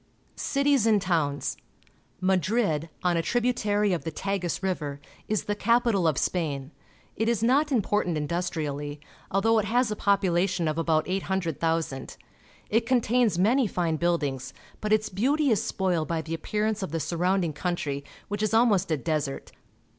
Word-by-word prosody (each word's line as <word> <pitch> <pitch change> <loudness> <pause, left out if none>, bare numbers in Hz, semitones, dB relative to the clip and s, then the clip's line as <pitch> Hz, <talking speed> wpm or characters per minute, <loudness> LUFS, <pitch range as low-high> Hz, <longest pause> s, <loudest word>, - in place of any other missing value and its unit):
Cities 280 -4 +2
and 215 -2 +4
Towns. 160 -6 -1 0.3
— - - -37
Madrid, 185 -4 +1
on 175 -1 +2
a - - +2
tributary 210 -2 +1
of 175 - -2
the 165 - -3
Tagus 185 0 -3
River, 150 -7 -2 0.3
is 215 -1 0
the 205 - -1
capital 225 -3 +2
of 155 -4 +1
Spain. 145 -5 -1 0.4
It 225 +2 0
is 230 -2 0
not 285 +6 +3
important 205 - +1
industriallj', 150 -2 -3 0.3
although 220 +4 +3
it 210 - -1
has 240 +1 +1
a - - -1
population 190 -4 +1
of 155 +1 -1
about 160 -1 +1
800,000. 165 -6 -2 0.5
It 225 +2 +2
contains 245 -5 +2
many 230 +7 +3
fine 170 -4 -1
buildings, 145 -6 -1 0.2
but 215 - -3
its 215 0 +3
beauty 275 +8 +1
is 215 - +3
spoiled 180 -5 0
by 165 -1 -2
the 160 - -5
appearance 210 +6 -1
of 190 - -3
the 165 - -1
surround 180 +3 +1
ing 155 - -3
country, 145 -4 -2 0.2
which 205 +1 -3
is 215 +1 +1
almost 210 -6 +3
a 155 - +1
desert. 150 -1 -3
185 Hz, 160 wpm, -27 LUFS, 160-215 Hz, 0.5 s, and